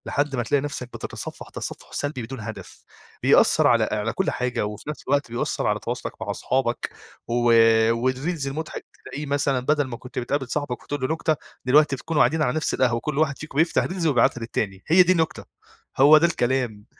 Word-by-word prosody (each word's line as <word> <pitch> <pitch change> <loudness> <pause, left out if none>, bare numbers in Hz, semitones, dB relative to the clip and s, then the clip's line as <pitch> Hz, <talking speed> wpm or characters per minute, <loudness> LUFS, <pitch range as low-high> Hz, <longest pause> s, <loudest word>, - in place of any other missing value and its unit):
لحد 145 -1 -1
ما 120 - -1
تلاقي 140 +4 +1
نفسك 145 -3 -5
بتتصفح - - -7
تصفح - - -7
سلبي 145 -3 -3
بدون 130 +3 -7
هدف، 110 0 -9 0.4
بيأثّر - - +5
على - - +4
على 105 +1 -1
كل 190 - 0
حاجة 125 -4 -1
وفي 105 +6 -7
نفس 150 - -6
الوقت 140 -2 0
بيأثّر 120 - -2
على - - +1
تواصلك - - -5
مع - - -2
اصحابك 125 -2 -1 0.4
و 115 - -3 0.6
والريلز 130 +6 -1
المُضحك 155 +4 -5 0.2
تلاقيه 150 +2 -6
مثلًا 140 -2 0
بدل 145 +4 +1
ما 120 -2 -6
كنت 125 - -7
بتقابل 135 +2 -2
صاحبك 140 -2 -3
وتقول 145 -1 -4
له 130 - 0
نكتة 160 -1 0 0.3
دلوقتي 145 +2 +4
تكونوا 150 +4 -1
قاعدين 155 +6 +3
على 125 -5 +1
نفس 155 - -1
القهوة 125 -2 +2
وكل 140 +4 -4
واحد 150 -3 +1
فيكم 155 -2 -8
بيفتح 165 +2 +3
ريلز 180 -2 -2
ويبعتها 120 -3 +2
للتاني. 100 -4 -3
هي 180 +3 +7
دي 180 - +2
النكتة، 170 -1 0 0.5
هو 145 +3 +8
ده 160 - +4
الكلام. 120 -8 -1
135 Hz, 190 wpm, -24 LUFS, 120-150 Hz, 0.6 s, هو